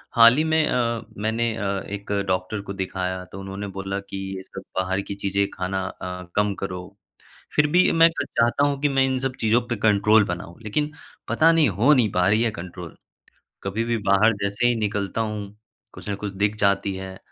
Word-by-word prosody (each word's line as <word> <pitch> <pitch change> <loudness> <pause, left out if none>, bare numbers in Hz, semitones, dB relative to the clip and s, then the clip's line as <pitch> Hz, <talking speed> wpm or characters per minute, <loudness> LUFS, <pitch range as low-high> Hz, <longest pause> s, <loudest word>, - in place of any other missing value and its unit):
हाल 115 +1 +8
ही 155 - +3
में 160 0 +2
अ, 115 -2 0 0.2
मैंने 110 +2 -1
अ, 100 -1 -2
एक 100 0 -6 0.2
डॉक्टर 95 +3 -1
को 100 0 -7
दिखाया 95 -1 -3
तो 95 - -8
उन्होंने 95 +1 -6
बोला 95 +1 -3
कि 100 0 -8 0.2
ये 95 - -7
सब 95 - -9 0.2
बाहर 95 +1 0
की 100 - -6
चीज़ें 100 0 0
खाना 95 +1 -2
अ, 90 -1 -6
कम 105 -1 +2
करो, 90 +1 -6 0.6
फिर 150 0 +4
भी 180 +1 +5
मैं 165 0 +6
चाहता 120 +4 +1
हूँ 140 -1 -1
कि 145 - +3
मैं 135 -1 +3
इन 130 0 0
सब 135 -1 -2
चीज़ों 115 +2 +3
पे 120 - -1
कंट्रोल 105 +1 +5
बनाऊँ, 85 -1 -5
लेकिन 150 +8 -1 0.4
पता 165 +1 +4
नहीं 160 -7 +4
हो 115 +10 +4
नहीं 120 -7 +3
पा 90 +1 +2
रही 110 +3 +3
है 115 - +1
कंट्रोल। 90 -3 -8 0.7
कभी 100 +4 -2
भी 115 0 0
बाहर 105 +3 +5
जैसे 100 +4 +1
ही 120 - +3
निकलता 105 -1 -2
हूँ, 105 -2 -4 0.4
कुछ - - -10
न 100 - -1
कुछ 100 -1 -5
दिख 100 +2 0
जाती 100 -1 +1
है, 95 0 -7
100 Hz, 200 wpm, -24 LUFS, 95-115 Hz, 0.7 s, हाल